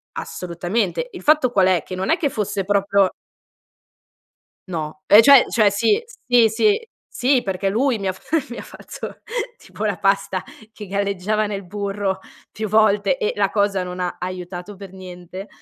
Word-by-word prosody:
Assolutamente, 180 - -3
il - - -9
fatto 300 -5 +3
qual 190 -4 +4
è? 180 -4 +2
Che 185 - -9
non 185 - -3
è 325 - +4
che 285 - 0
fosse 205 -3 -2
proprio 200 -1 +2 1.6
No, 165 +2 -5
ehm, 210 +2 +9
cioè- 280 -1 +8
cioè 215 -3 +3
sì, 235 - +2 0.2
sì, 240 -3 +5
sì, 425 - +1 0.2
sì 255 0 +1
perché 195 -1 -2
lui 235 +2 +1
mi 195 - -3
ha - - +1
f 290 - -3
mi 240 - -7
ha - - -5
fatto - - -9 0.4
tipo 215 - -7
la 205 -3 -1
pasta 195 -2 0 0.3
che 210 -2 -9
galleggiava 200 +2 -1
nel 200 -1 -4
burro 200 0 -3 0.3
più 215 0 -4
volte 215 - +3
e 455 -1 0
la - - +2
cosa 200 -2 +1
non 180 0 -6
ha 180 - -3
aiutato 180 +2 -6
per 195 -1 -11
niente 185 +1 -9
200 Hz, 170 wpm, -21 LUFS, 185-225 Hz, 1.6 s, ehm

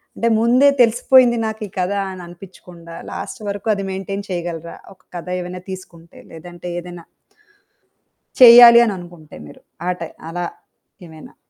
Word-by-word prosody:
అంటే 230 - -2
ముందే 250 +5 +4
తెలిసిపోయింది 240 +1 +4
నాకు 220 0 -7
ఈ - - -18
కథ 180 +2 -1 0.2
అని 185 -1 -10
అనిపిచ్చకుండా, 175 -1 -14 0.2
లాస్ట్ - - -8
వరకు 205 +2 -5
అది 195 -1 -5
మెయిన్‌టైన్ 195 +1 -6
చేయగలరా? 170 -2 -6 0.2
ఒక 190 - -31 0.2
కథ 175 - -9
ఏమైనా 180 +1 -8
తీసుకుంటే, 170 -3 -12
లేదంటే 175 +2 -10
ఏదైనా... 175 -1 -11 1.4
చెయ్యాలి 235 -1 +10
అని 210 - -2
అనుకుంటే 175 -3 -13
మీరు. - - -15 0.3
ఆటై 180 -2 -4 0.2
అలా 175 +1 -4 0.6
ఏమేనాా? 160 -2 -15
180 Hz, 135 wpm, -18 LUFS, 170-220 Hz, 1.4 s, చెయ్యాలి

